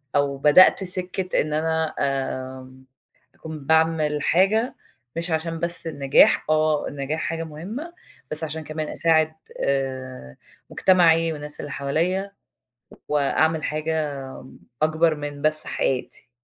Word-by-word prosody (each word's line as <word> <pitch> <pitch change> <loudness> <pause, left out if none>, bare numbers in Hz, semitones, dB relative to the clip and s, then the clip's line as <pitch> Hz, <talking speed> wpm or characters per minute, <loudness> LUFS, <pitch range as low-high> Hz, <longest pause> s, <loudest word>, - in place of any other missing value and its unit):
أو 140 -1 +1
بدأت 150 +7 +6
سِكَّة 185 0 -2
إن 150 0 -3
أنا 160 0 0
آآ، 130 -1 -3 0.6
أكون 160 -1 -8
باعمل 160 -2 +2
حاجة 210 +7 +2 0.4
مش 170 0 -1
عشان 165 +1 -2
بس 170 0 0
النجاح، 140 -3 +4
آه، 155 -1 +2
النجاح 145 +3 -4
حاجة 165 0 -3
مهمة، 205 - -7 0.4
بس 155 +1 -1
عشان 160 +1 -5
كمان 155 0 -4
أساعد 160 -1 +2 0.3
آآ، 130 - -3 0.3
مجتمعي 165 -3 +4
والناس 150 0 -7
اللي 145 - -6
حواليا، 180 +8 -1 0.8
وأعمل 155 +2 +1
حاجة 155 -1 -1 0.7
أكبر 160 +1 +3
من 145 -1 -6
بس 155 0 +1
حياتي. 125 -2 -3
155 Hz, 115 wpm, -23 LUFS, 145-165 Hz, 0.8 s, بدأت